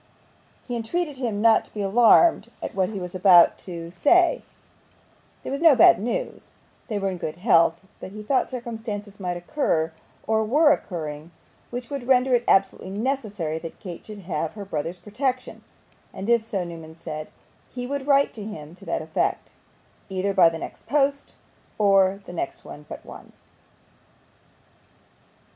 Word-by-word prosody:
He 245 Hz, -, -3 dB
entreated 290 Hz, +6 st, -2 dB
him 225 Hz, -5 st, -2 dB
not 230 Hz, -1 st, +5 dB
to -, -, -20 dB
be 205 Hz, -, -2 dB
alarmed 235 Hz, -, +5 dB
at -, -, -4 dB
what 190 Hz, -1 st, 0 dB
he 210 Hz, -3 st, -5 dB
was 180 Hz, -1 st, -6 dB
about 180 Hz, -2 st, +6 dB
to 170 Hz, -2 st, -8 dB
say; 345 Hz, -, +3 dB, 1.0 s
there -, -, -5 dB
was 280 Hz, +2 st, -3 dB
no 325 Hz, -4 st, +7 dB
bad 200 Hz, -7 st, +7 dB
news 230 Hz, +4 st, -4 dB, 0.3 s
they 215 Hz, -, -2 dB
were 195 Hz, -1 st, -1 dB
in 180 Hz, -, -6 dB
good 155 Hz, -, -4 dB
health 170 Hz, -4 st, +3 dB, 0.2 s
but 185 Hz, -, -8 dB
he 210 Hz, +1 st, -8 dB
thought 260 Hz, +5 st, +1 dB
circumstances 220 Hz, -5 st, -6 dB
might 180 Hz, -2 st, -3 dB
occur, 175 Hz, -, -1 dB, 0.3 s
or 220 Hz, 0 st, +1 dB
were 295 Hz, +7 st, +4 dB
occurring, 155 Hz, -, -3 dB, 0.4 s
which 245 Hz, +2 st, -6 dB
would 275 Hz, -4 st, -5 dB
render 260 Hz, 0 st, +4 dB
it 240 Hz, -1 st, +3 dB
absolutely 195 Hz, -1 st, +2 dB
necessary 205 Hz, -, -2 dB
that 165 Hz, 0 st, -9 dB
Kate 180 Hz, -5 st, -8 dB
should 210 Hz, -2 st, -10 dB
have 165 Hz, -3 st, -3 dB
her 205 Hz, -2 st, -7 dB
brother's 165 Hz, 0 st, -4 dB
protection, 255 Hz, +6 st, -3 dB, 0.5 s
and 195 Hz, +4 st, -6 dB
if 235 Hz, -1 st, +4 dB
so, 205 Hz, -4 st, -3 dB
Newman 165 Hz, -2 st, -9 dB
said, 155 Hz, -2 st, -7 dB, 0.4 s
he 245 Hz, -1 st, -6 dB
would 280 Hz, +1 st, -4 dB
write 280 Hz, -1 st, +4 dB
to 215 Hz, -, -7 dB
him 160 Hz, -7 st, -8 dB
to 180 Hz, -, -16 dB
that -, -, -2 dB
effect, -, -, -2 dB, 0.6 s
either 190 Hz, +1 st, -1 dB
by 180 Hz, -3 st, +6 dB
the 165 Hz, -, -6 dB
next -, -, -9 dB
post 280 Hz, -1 st, 0 dB, 0.4 s
or 195 Hz, -1 st, +3 dB
the -, -, -9 dB
next 175 Hz, -, -4 dB
but 150 Hz, 0 st, -10 dB
one. -, -, -12 dB
205 Hz, 160 wpm, -24 LUFS, 175-245 Hz, 1.0 s, no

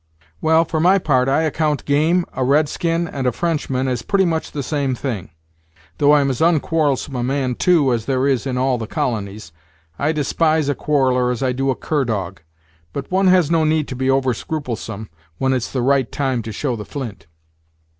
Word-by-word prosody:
"Well, 160 Hz, +1 st, +4 dB
for 160 Hz, -, -2 dB
my 180 Hz, +4 st, +5 dB
part 135 Hz, -7 st, +1 dB
I 150 Hz, +4 st, +2 dB
account 155 Hz, -1 st, -1 dB
game, 160 Hz, +5 st, +2 dB
a 130 Hz, -, -1 dB
red 145 Hz, +4 st, +3 dB
skin, 170 Hz, +2 st, -1 dB
and 135 Hz, -5 st, -3 dB
a -, -, +3 dB
Frenchman 135 Hz, -4 st, -1 dB
as 125 Hz, -2 st, -1 dB
pretty 200 Hz, -1 st, +1 dB
much 165 Hz, -2 st, -2 dB
the 145 Hz, -, -4 dB
same 140 Hz, -2 st, -1 dB
thing; 115 Hz, -8 st, -4 dB, 0.7 s
though 145 Hz, 0 st, +5 dB
I'm 140 Hz, -2 st, +2 dB
as 130 Hz, -, -4 dB
onquarrelsome 155 Hz, -4 st, +1 dB
a 125 Hz, -, -2 dB
man, 130 Hz, 0 st, -1 dB
too, 150 Hz, -3 st, +3 dB
as 115 Hz, -2 st, -2 dB
there 130 Hz, -1 st, 0 dB
is 135 Hz, -1 st, 0 dB
in 125 Hz, -1 st, -2 dB
all 130 Hz, -1 st, +1 dB
the 110 Hz, -, -5 dB
colonies. 105 Hz, -6 st, -3 dB, 0.5 s
I 145 Hz, -, +1 dB
despise 155 Hz, 0 st, +1 dB
a -, -, +2 dB
quarreller 130 Hz, -4 st, +1 dB
as 125 Hz, +2 st, -2 dB
I 130 Hz, -, +1 dB
do 135 Hz, +2 st, -1 dB
a 130 Hz, -, +1 dB
cur 150 Hz, -4 st, -1 dB
dog; 95 Hz, -6 st, -3 dB, 0.5 s
but 140 Hz, +3 st, -6 dB
one 190 Hz, +1 st, +3 dB
has 180 Hz, -4 st, +4 dB
no 165 Hz, -1 st, +3 dB
need 155 Hz, -1 st, +1 dB
to 130 Hz, -, -5 dB
be 130 Hz, +1 st, -1 dB
over 135 Hz, -1 st, +2 dB
scrupulsome 115 Hz, -6 st, -5 dB, 0.3 s
when 130 Hz, 0 st, +1 dB
it's 125 Hz, -3 st, -2 dB
the 130 Hz, -3 st, -1 dB
right 135 Hz, -2 st, +2 dB
time 135 Hz, -4 st, -1 dB
to 110 Hz, 0 st, -7 dB
show 125 Hz, +4 st, -2 dB
the 105 Hz, -, -6 dB
flint." 115 Hz, -, -7 dB
135 Hz, 205 wpm, -20 LUFS, 125-155 Hz, 0.7 s, my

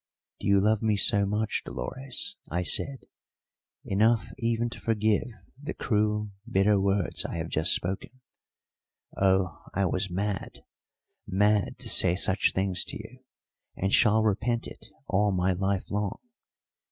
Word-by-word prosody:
"Do -, -, -4 dB
you 100 Hz, 0 st, +5 dB
love 105 Hz, +2 st, +2 dB
me 110 Hz, -2 st, +1 dB
so 100 Hz, 0 st, +3 dB
much, 105 Hz, +2 st, -1 dB
Dolores," 135 Hz, +9 st, -3 dB
I 90 Hz, +1 st, -1 dB
said, 135 Hz, -, +2 dB, 0.8 s
"enough 110 Hz, +3 st, +2 dB
even 115 Hz, 0 st, 0 dB
to -, -, -9 dB
forgive 110 Hz, -1 st, +1 dB, 0.3 s
the 145 Hz, -, -5 dB
cruel, 105 Hz, -1 st, 0 dB, 0.2 s
bitter 100 Hz, -2 st, +3 dB
words 100 Hz, -2 st, 0 dB
I -, -, -5 dB
have 85 Hz, 0 st, -4 dB
just 80 Hz, +4 st, +4 dB
spoken? 95 Hz, +2 st, -3 dB, 1.1 s
Oh, 95 Hz, -1 st, +1 dB
I 100 Hz, +1 st, +2 dB
was 95 Hz, +2 st, 0 dB
mad 100 Hz, +2 st, -4 dB, 0.6 s
mad 105 Hz, +1 st, +1 dB
to -, -, -9 dB
say 90 Hz, -2 st, +4 dB
such 95 Hz, 0 st, +2 dB
things 95 Hz, -2 st, 0 dB
to -, -, -5 dB
you, 115 Hz, +4 st, -11 dB, 0.6 s
and 95 Hz, +1 st, -1 dB
shall 110 Hz, -2 st, +5 dB
repent 115 Hz, +3 st, 0 dB
it -, -, -9 dB, 0.2 s
all 105 Hz, +1 st, +2 dB
my 90 Hz, 0 st, +1 dB
life 95 Hz, +1 st, -2 dB
long! 105 Hz, 0 st, -2 dB
100 Hz, 140 wpm, -27 LUFS, 95-110 Hz, 1.1 s, you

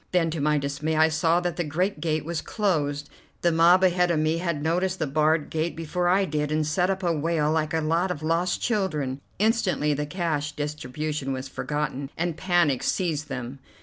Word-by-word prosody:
Then 165 Hz, -3 st, +2 dB
to 155 Hz, -2 st, -3 dB
my 150 Hz, +1 st, +2 dB
dismay, 140 Hz, +3 st, -2 dB
I 160 Hz, +1 st, +5 dB
saw 165 Hz, +2 st, +2 dB
that 175 Hz, -2 st, -2 dB
the 175 Hz, -, 0 dB
great 170 Hz, +3 st, -1 dB
gate 155 Hz, -2 st, -1 dB
was 165 Hz, -1 st, -2 dB
closed. 145 Hz, -9 st, -1 dB, 0.4 s
The 175 Hz, -, +4 dB
mob 170 Hz, +3 st, +5 dB
ahead 180 Hz, -1 st, +3 dB
of 170 Hz, -, +2 dB
me 155 Hz, +2 st, +1 dB
had 170 Hz, -4 st, -2 dB
noticed 180 Hz, +4 st, 0 dB
the 160 Hz, -, -1 dB
barred 155 Hz, +2 st, +1 dB
gate 160 Hz, +1 st, -1 dB
before 175 Hz, +2 st, -1 dB
I 190 Hz, +2 st, +3 dB
did, 150 Hz, -3 st, -2 dB
and 155 Hz, 0 st, +1 dB
set 175 Hz, +5 st, +1 dB
up 190 Hz, 0 st, -1 dB
a 170 Hz, -1 st, +2 dB
wail 155 Hz, -1 st, 0 dB
like 155 Hz, 0 st, 0 dB
a 160 Hz, -, +1 dB
lot 165 Hz, +4 st, +1 dB
of 160 Hz, -4 st, -4 dB
lost 165 Hz, +3 st, +1 dB
children. 150 Hz, -, -1 dB, 0.2 s
Instantly 200 Hz, -8 st, +1 dB
the 150 Hz, +1 st, -2 dB
cash 150 Hz, -4 st, -2 dB
distribution 150 Hz, -1 st, -3 dB
was 130 Hz, 0 st, -5 dB
forgotten, 140 Hz, 0 st, -3 dB
and 175 Hz, -1 st, -1 dB
panic 175 Hz, -7 st, +2 dB
seized 155 Hz, -5 st, -1 dB
them. 130 Hz, 0 st, -5 dB
160 Hz, 200 wpm, -25 LUFS, 150-175 Hz, 0.4 s, I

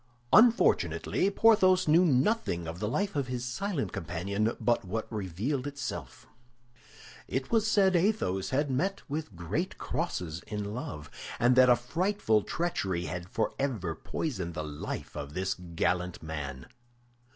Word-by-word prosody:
Unfortunately 230 Hz, -3 st, +4 dB
Porthos 195 Hz, -4 st, +4 dB
knew 165 Hz, +4 st, +6 dB
nothing 135 Hz, -, +1 dB
of 85 Hz, +2 st, -6 dB
the 105 Hz, -, -1 dB
life 200 Hz, -, -1 dB
of 140 Hz, -3 st, 0 dB
his 125 Hz, -1 st, -3 dB
silent 165 Hz, +5 st, -2 dB
companion 95 Hz, +5 st, -2 dB
but 120 Hz, -1 st, +1 dB
what 110 Hz, +4 st, -3 dB
revealed 110 Hz, -, -2 dB
itself. 145 Hz, 0 st, -6 dB, 1.0 s
It 130 Hz, 0 st, -3 dB
was 220 Hz, -2 st, +3 dB
said 195 Hz, -3 st, +4 dB
Athos 170 Hz, -, +1 dB
had 140 Hz, +1 st, 0 dB
met 190 Hz, +10 st, -1 dB
with 150 Hz, -, -4 dB
great 95 Hz, -, -3 dB
crosses 90 Hz, -, -3 dB
in 105 Hz, -1 st, -4 dB
love, 75 Hz, -, -6 dB, 0.3 s
and 120 Hz, +1 st, +4 dB
that 130 Hz, 0 st, +7 dB
a 125 Hz, -, +8 dB
frightful 140 Hz, -, +1 dB
treachery 95 Hz, -, -2 dB
had 90 Hz, +1 st, -5 dB
forever 110 Hz, -6 st, -1 dB
poisoned 90 Hz, -, -4 dB
the 75 Hz, -, -3 dB
life 75 Hz, -1 st, -6 dB
of 70 Hz, +2 st, -6 dB
this 95 Hz, +1 st, 0 dB
gallant 90 Hz, 0 st, -2 dB
man. 70 Hz, -5 st, -5 dB
120 Hz, 140 wpm, -30 LUFS, -, 1.0 s, a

